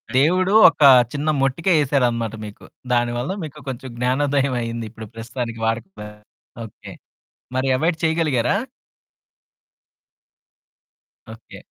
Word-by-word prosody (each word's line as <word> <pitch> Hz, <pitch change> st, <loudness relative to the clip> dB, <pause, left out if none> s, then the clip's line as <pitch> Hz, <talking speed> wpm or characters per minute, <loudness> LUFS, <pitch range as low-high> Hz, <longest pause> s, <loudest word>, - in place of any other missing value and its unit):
దేవుడు 185 Hz, +8 st, +3 dB
ఒకా 145 Hz, -4 st, +5 dB, 0.2 s
చిన్న 145 Hz, +2 st, -2 dB
మొట్టికాయేసారనమాట 135 Hz, -, +1 dB
మీకు. 105 Hz, -, -12 dB, 0.3 s
దాని 120 Hz, -1 st, +1 dB
వల్ల 125 Hz, +9 st, -3 dB
మీకు 150 Hz, -1 st, -9 dB
కొంచెం 130 Hz, 0 st, -7 dB
జ్ఞానోదయవయింది 125 Hz, -3 st, -1 dB
ఇప్పుడు 110 Hz, 0 st, -10 dB
ప్రస్తుతానికి 115 Hz, 0 st, -6 dB
వాడకపోయారు. 110 Hz, -, -5 dB, 0.4 s
ఓకే. 105 Hz, -, -13 dB, 0.6 s
మరి 130 Hz, +1 st, 0 dB
అవాయిడ్ 160 Hz, +4 st, 0 dB
చెయగలిగారా? 160 Hz, -, +1 dB, 2.8 s
ఓకే. -, -, -14 dB
130 Hz, 90 wpm, -21 LUFS, 115-150 Hz, 2.8 s, ఒకా